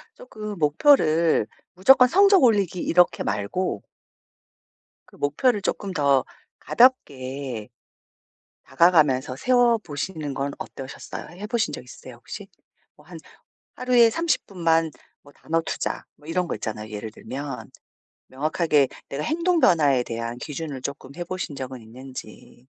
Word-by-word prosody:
쪼금 210 - -8
목표를 160 - +3 0.3
무조건 250 +7 +6
성적 390 +4 +5
올리기 200 -7 +3
이렇게 180 +1 +3
말고 105 - -2 1.3
그 - - -19
목표를 205 - +1
쪼끔 195 0 -3
더 140 -5 +3 0.4
가볍게 135 - +1 1.0
다가가면서 150 -7 +3
세워보시는 190 - 0
건 140 +1 -2
어떠셨어요? 135 +2 -8
해보신 220 +1 -1
적 - - -6
있으세요 - - -12
혹시? - - -9 0.5
뭐 - - -21
한 - - -10 0.6
하루에 245 -2 +4
30 330 +5 -1
분만 165 -4 +1 0.3
뭐 145 - -18
단어 165 +1 -1
투자 - - -4
뭐 150 - -19
이런 180 +2 -1
거 - - -3
있잖아요 110 -1 -5
예를 110 +1 -6
들면. 130 -1 -7 0.6
명확하게 150 +1 +1 0.2
내가 140 +2 -4
행동 340 - +1
변화에 145 - +4
대한 115 0 -5
기준을 145 -2 -6
쪼끔 140 0 -6
해보신 175 -3 -5
적은 130 -1 -6
있는지. 120 0 -11
155 Hz, 275 characters per minute, -24 LUFS, 130-205 Hz, 1.3 s, 무조건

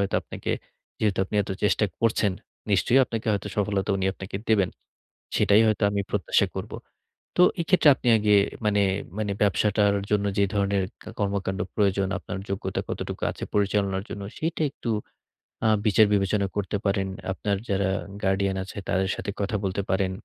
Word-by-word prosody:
হয়তো 100 - -1
আপনাকে - - -5 0.5
যেহেতু 105 -4 +1
আপনি 95 - -9
এত 100 - -8
চেষ্টা 105 +1 +3 0.2
করছেন, 110 -3 +2 0.4
নিশ্চয়ই 120 +7 +4
আপনাকে 115 -2 -5
হয়তো 105 0 -2
সফলতা 100 0 0
উনি 95 0 0
আপনাকে 95 0 -6
দেবেন। 100 -5 +3 0.7
সেটাই 105 +2 +5
হয়তো 110 - 0
আমি 100 0 0
প্রত্যাশা 100 -6 +2
করব। - - -5 0.6
তো 180 - +6 0.2
এক্ষেত্রে 175 -2 +4
আপনি 125 - -2
আগে 105 -1 +4 0.3
মানে, 105 -1 +3 0.4
মানে 105 -2 -1
ব্যবসাটার 100 0 +3 0.2
জন্য 105 -1 +2
যে 100 - +5
ধরনের 100 -1 +1 0.4
কর্মকান্ড 100 -1 -1
প্রয়োজন, 100 -2 +2
আপনার 95 - -6
যোগ্যতা 100 - -2
কতটুকু - - -5
আছে - - -6
পরিচালনার 100 -1 +1
জন্য 100 - -5 0.2
সেটা 160 0 -1
একটু 125 -4 -5 0.8
আ - - +5 0.2
বিচার 110 +1 +6
বিবেচনা 100 0 +1
করতে 105 0 -1
পারেন। 100 -1 +1 0.3
আপনার 100 +1 -1
যারা 100 -1 +1 0.3
গার্ডিয়ান 95 0 +1
আছে 95 - -10
তাদের 95 +1 +1
সাথে 100 - -4
কথা 100 +2 -1
বলতে 95 +1 -1
পারেন। 95 0 +1
100 Hz, 155 wpm, -26 LUFS, 95-105 Hz, 0.8 s, তো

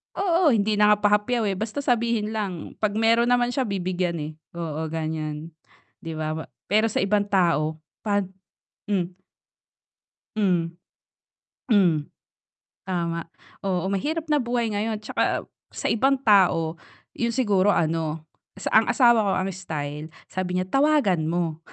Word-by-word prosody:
oo, 345 -7 +3
hindi 210 0 +1
na 210 0 +6
nga - - +1
pahapyaw, 210 +3 +2
eh, 190 - -2
basta 220 +7 -3
sabihin 235 -4 +1
lang 195 -6 -4
'pag 210 -1 0
meron 230 +2 +3
naman 245 0 +3
siya 255 -2 -1
bibigyan, 180 -3 -1
eh, 150 +1 -4 0.2
oo 160 -2 -3
ganiyan. 155 0 -4 0.5
'Di 165 - -6
ba, 155 0 -3 0.2
pero 215 +2 +4
sa 215 - -1
ibang 205 0 +1
tao 160 -5 +1 0.2
'pag 205 -1 +2 0.7
hmm. 180 -2 -1 1.2
Mhm. 175 -5 +1 1.0
Mhm. 170 -8 +3 0.8
Tama, 170 -2 -2 0.4
oo 180 -2 0
mahirap 305 - -1
na 295 - +4
buhay 240 -3 -1
ngayon 215 +2 -1
'tsaka - - 0 0.3
sa - - -1
ibang 270 +5 +3
tao, 180 -9 +3 0.3
yun 235 0 -2
siguro 205 -7 +2
ano 160 -1 -1 0.3
sa - - -4
ang 220 +1 +5
asawa 240 -4 +5
ko 200 -2 +1
ang 190 +1 -1
style 150 -4 -5 0.2
sabi 180 -1 -2
niya, 185 - 0
"Tawagan 270 - +2
mo." 165 -2 -1
195 Hz, 140 wpm, -24 LUFS, 165-225 Hz, 1.2 s, na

